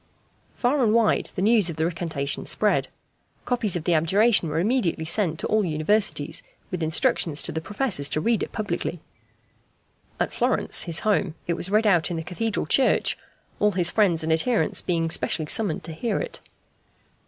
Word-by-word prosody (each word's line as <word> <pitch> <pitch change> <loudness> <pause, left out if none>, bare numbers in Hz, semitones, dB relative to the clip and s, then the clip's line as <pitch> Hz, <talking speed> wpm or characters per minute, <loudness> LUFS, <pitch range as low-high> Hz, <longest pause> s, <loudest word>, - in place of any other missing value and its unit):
Far 265 +3 +1
and 220 -1 +2
wide 230 -2 +2
the 185 - -2
news 215 -4 +4
of 165 - -5
the 160 +1 -1
recantation 160 -4 -3
spread. - - +1 0.6
Copies 230 -7 0
of 170 - -3
the 175 - +1
abjuration 190 +4 +3
were 150 - -3
immediately 185 -4 0
sent 165 -2 +1
to - - -2
all 215 0 +1
Universities, 160 -1 0 0.3
with 180 -2 -4
instructions 160 - 0
to - - 0
the 160 - -4
professors 205 - -1
to - - -1
read 230 +6 +1
it - - -4
publicly. 180 -5 -4 1.2
At - - -1
Florence, - - 0
his 165 -2 +2
home, 200 -6 0
it 170 - -1
was 175 +2 -3
read 215 +2 +2
out 175 -6 +3
in 175 - -3
the 160 - -4
Cathedral 205 +4 -3
church, 260 - +2 0.4
all 210 0 +2
his 175 -1 +3
friends 180 -7 +2
and 160 0 +1
adherents 225 +8 +1
being 165 -2 -1
specially 160 -1 +1
summoned 185 +1 0
to 165 - -6
hear 225 +8 -2
it. - - -5
180 Hz, 175 wpm, -24 LUFS, 160-215 Hz, 1.2 s, news